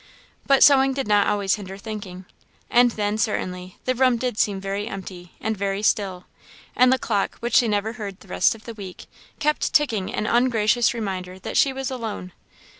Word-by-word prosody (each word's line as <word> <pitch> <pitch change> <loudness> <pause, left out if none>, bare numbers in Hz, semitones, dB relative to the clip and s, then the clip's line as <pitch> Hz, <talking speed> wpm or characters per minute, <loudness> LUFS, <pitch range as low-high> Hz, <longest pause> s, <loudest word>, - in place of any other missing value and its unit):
But 275 -1 +6
sewing 270 -1 +6
did 270 -4 -3
not 205 -1 +3
always 200 -2 +1
hinder 195 -2 -8
thinking. 200 -3 -8 0.5
And 245 0 +6
then, 210 -1 -2
certainly, 185 -5 -3
the 255 - +1
room 255 -1 +3
did 245 -2 -3
seem 200 -2 +1
very 195 +2 -3
empty, 185 -4 -8
and 220 0 -2
very 200 0 -2
still; 195 -4 0 0.5
and 255 0 +5
the 260 - +4
clock, 205 -6 -1
which 240 +1 +1
she 240 - +4
never 210 +1 -1
heard 205 -5 -7
the - - -17
rest 195 - +2
of 220 - -15
the 230 - -7
week, 195 -4 -9 0.3
kept 300 +1 0
ticking 225 -11 +2
an 210 - -2
ungracious 235 0 +2
reminder 185 -4 -4
that 190 - -7
she 280 -3 +4
was 265 0 -4
alone. 220 -7 -5
215 Hz, 190 wpm, -23 LUFS, 195-245 Hz, 0.5 s, But